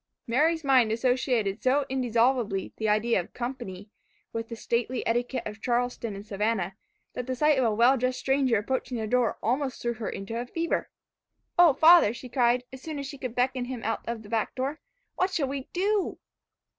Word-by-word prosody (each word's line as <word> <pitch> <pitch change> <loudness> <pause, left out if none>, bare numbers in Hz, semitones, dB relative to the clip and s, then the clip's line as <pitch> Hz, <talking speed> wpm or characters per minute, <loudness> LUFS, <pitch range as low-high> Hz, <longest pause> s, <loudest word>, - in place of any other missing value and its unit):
Mary's 310 +7 +2
mind 260 -5 +4
associated 235 -3 0
so 275 +2 +2
indissolubly 240 -5 +1
the 220 -1 0
idea 215 +1 +2
of 175 - -7
company, 210 -6 -6 0.4
with 225 0 -4
the 230 - -5
stately 235 +2 -2
etiquette 240 +3 0
of 210 +1 -7
Charleston 240 -3 -1
and 200 +1 -8
Savannah, 200 -2 -1 0.4
that 250 - -5
the 260 - -1
sight 300 +1 +3
of 255 - +2
a 225 - +3
well 245 +4 +5
dressed 255 +1 0
stranger 265 -3 +2
approaching 250 +3 -2
their 220 - -2
door, 245 +1 +2
threw - - -11
her - - +4
almost 265 -1 -2
into 230 -1 -3
a 245 - -6
fever. 335 +5 -2 0.7
"Oh! 345 -4 +8
father," 320 -6 +6
she 255 - -9
cried, 245 -1 +2
as 260 - -9
soon 310 0 -5
as 280 - -4
she 280 0 -8
could 250 -3 -5
beckon 250 0 0
him 245 -2 -6
out 225 - -1
of 230 -1 -4
the 205 - -13
back 225 -2 -1
door, 270 +4 -2 0.4
"what 370 - +2
shall 325 -7 0
we 270 0 -5
do?" 400 +2 0
245 Hz, 195 wpm, -27 LUFS, 225-270 Hz, 0.7 s, Oh